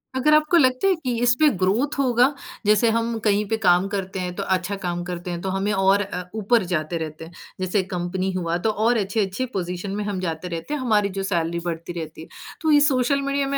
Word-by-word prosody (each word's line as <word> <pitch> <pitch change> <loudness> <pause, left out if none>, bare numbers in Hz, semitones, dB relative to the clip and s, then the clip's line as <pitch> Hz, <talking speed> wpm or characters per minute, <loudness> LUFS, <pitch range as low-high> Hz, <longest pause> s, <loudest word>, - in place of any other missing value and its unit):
अगर 300 +4 +3
आपको 305 +3 +4
लगता 255 +4 +3
है 380 - +4
कि 255 -7 -3
इस 240 0 +5
पे 310 - +6
ग्रोथ 235 +11 +1
होगा, 255 +1 +3 0.3
जैसे 215 +2 +4
हम 230 0 -1
कहीं 210 -1 +1
पे 225 - +1
काम 180 -1 +3
करते 195 -2 -3
हैं, 180 -1 -3
तो - - -3
अच्छा 190 +1 -1
काम 175 0 -2
करते 175 0 -5
हैं 170 - -4
तो 190 - -3
हमें 195 +2 -1
और 195 +1 +3
अ, 180 -2 -4
ऊपर 220 0 +2
जाते 155 +1 -1
रहते 160 0 -6
हैं। 165 - -13 0.3
जैसे 185 +2 +1
कंपनी 185 +2 -2
हुआ 170 -2 -1
तो - - +3
और 220 +3 +2
अच्छे-अच्छे 200 +3 -1
पोज़ीशन 180 +1 -3
में 210 - -2
हम 200 -3 -2
जाते 170 -1 -3
रहते 170 - -5
हैं, 290 - -2
हमारी 210 -5 +2
जो 195 - -1
सैलरी 170 -3 -1
बढ़ती 170 +1 -4
रहती 160 0 -7
है। - - -10 0.3
तो 315 -1 +2
ये 295 - +7
सोशल 270 +2 +1
मीडिया 275 0 0
में 275 0 -1
200 Hz, 230 wpm, -23 LUFS, 180-240 Hz, 0.3 s, ये